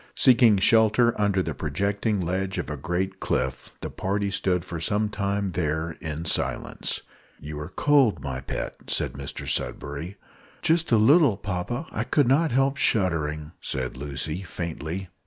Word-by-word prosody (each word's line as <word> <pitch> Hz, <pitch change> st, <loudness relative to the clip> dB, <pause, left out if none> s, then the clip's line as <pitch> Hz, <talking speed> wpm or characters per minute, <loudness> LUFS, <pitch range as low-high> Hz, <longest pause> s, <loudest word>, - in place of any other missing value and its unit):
Seeking 120 Hz, -5 st, +6 dB
shelter 110 Hz, +3 st, +4 dB
under 100 Hz, -2 st, +2 dB
the -, -, -3 dB
projecting 100 Hz, +7 st, -1 dB
ledge 95 Hz, +2 st, -2 dB
of -, -, -3 dB
a -, -, -2 dB
great 95 Hz, +2 st, -2 dB
cliff, 65 Hz, 0 st, -2 dB
the -, -, -5 dB
party 100 Hz, +1 st, -1 dB
stood 90 Hz, -2 st, 0 dB
for 85 Hz, -2 st, -5 dB
some 105 Hz, +6 st, 0 dB
time 100 Hz, -1 st, -1 dB
there 80 Hz, -1 st, -1 dB
in 80 Hz, +1 st, -4 dB
silence. -, -, 0 dB, 0.4 s
"You 75 Hz, 0 st, -7 dB
are 75 Hz, +2 st, -6 dB
cold, 140 Hz, +1 st, +3 dB
my 65 Hz, -3 st, -3 dB
pet," -, -, -4 dB
said -, -, 0 dB
Mr 70 Hz, 0 st, -6 dB
Sudberry. 70 Hz, +8 st, -2 dB, 0.5 s
"Just 165 Hz, -1 st, +2 dB
a 115 Hz, -, +6 dB
little, 130 Hz, -, +5 dB
papa; 100 Hz, -, -3 dB
I -, -, -2 dB
could 145 Hz, -4 st, +2 dB
not 150 Hz, +5 st, +3 dB
help 135 Hz, +2 st, +2 dB
shuddering," 75 Hz, -, +1 dB
said 65 Hz, -1 st, -3 dB
Lucy, 75 Hz, +5 st, -4 dB
faintly. 85 Hz, 0 st, -5 dB
95 Hz, 155 wpm, -25 LUFS, 80-110 Hz, 0.5 s, Seeking